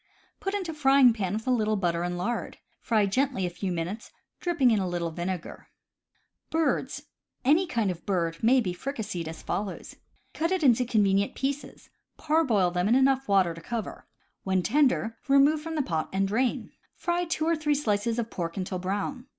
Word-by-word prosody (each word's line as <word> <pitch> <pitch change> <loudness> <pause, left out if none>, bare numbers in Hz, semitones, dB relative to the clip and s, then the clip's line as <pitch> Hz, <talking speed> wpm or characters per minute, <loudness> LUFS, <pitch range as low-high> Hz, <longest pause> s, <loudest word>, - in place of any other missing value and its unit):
Put 390 +1 -2
into 365 -5 -3
frying 270 -4 +5
pan 195 -4 -2
with 220 +1 -3
a 255 - +1
little 215 -3 +1
butter 175 -4 0
and 175 0 -2
lard. 235 +7 -3 0.2
Fry 220 -3 +2
gently 255 0 0
a 175 - -3
few 180 +2 -4
minutes, 175 +6 -4 0.3
dropping 330 -8 +2
in 215 - +3
a 190 - -1
little 175 -1 -2
vinegar. 175 +1 -5 1.8
Any 320 +7 +4
kind 230 - 0
of 175 - -9
bird 170 -4 -1
may 250 +3 +5
be 185 -6 -2
fricasseed 205 - -4
as 160 0 -8
follows: 200 -2 -4 0.4
Cut 330 +2 -1
it 375 -3 0
into 250 -2 +4
convenient 200 -4 +2
pieces, 275 +1 -4 0.3
parboil 270 - +2
them 180 +2 0
in 230 - +4
enough 270 0 +3
water 195 -4 +3
J. 165 - -10
J - - -14
to - - -18
cover; 235 -3 -5 0.4
when 190 -1 +1
tender, 255 -3 +1
remove 280 +3 +4
from 325 +1 -5
the 300 - +1
pot 160 -8 -2
and 195 +1 +1
drain. 240 +5 -1 0.2
Fry 350 0 -1
two 315 -2 -1
or 335 +1 +2
three 300 -1 0
slices 225 -4 0
of 230 -1 -2
pork 170 0 -4
until 185 -1 -3
brown. 205 +8 -3
220 Hz, 185 wpm, -27 LUFS, 185-275 Hz, 1.8 s, frying